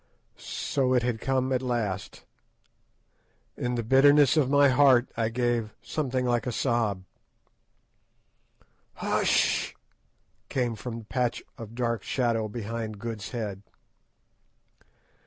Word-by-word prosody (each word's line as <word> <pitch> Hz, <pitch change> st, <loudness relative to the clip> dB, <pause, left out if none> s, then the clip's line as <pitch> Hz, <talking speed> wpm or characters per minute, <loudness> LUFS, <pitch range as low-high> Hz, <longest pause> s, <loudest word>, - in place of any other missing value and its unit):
So 130 Hz, -2 st, -1 dB
it 125 Hz, -, +2 dB
had 120 Hz, -2 st, -2 dB
come 130 Hz, 0 st, 0 dB
at 130 Hz, -, +1 dB
last! 110 Hz, -7 st, -3 dB, 1.3 s
In 125 Hz, 0 st, -2 dB
the 120 Hz, -, -2 dB
bitterness 140 Hz, +4 st, +5 dB
of 145 Hz, -5 st, +2 dB
my 145 Hz, 0 st, +5 dB
heart 130 Hz, -2 st, +5 dB
I 115 Hz, -1 st, 0 dB
gave 115 Hz, -2 st, -1 dB
something 130 Hz, -4 st, -2 dB
like 120 Hz, 0 st, 0 dB
a -, -, 0 dB
sob. 115 Hz, -6 st, 0 dB, 1.9 s
"Hush—h—h!" -, -, +1 dB, 0.7 s
came 125 Hz, -3 st, 0 dB
from 115 Hz, +2 st, -6 dB
the 115 Hz, -, -10 dB
patch 125 Hz, +1 st, -1 dB
of 115 Hz, 0 st, -10 dB
dark 115 Hz, -3 st, -1 dB
shadow 115 Hz, -3 st, 0 dB
behind 110 Hz, 0 st, -5 dB
Good's 110 Hz, -1 st, -6 dB
head. 105 Hz, -5 st, -4 dB
120 Hz, 115 wpm, -27 LUFS, 115-130 Hz, 1.9 s, bitterness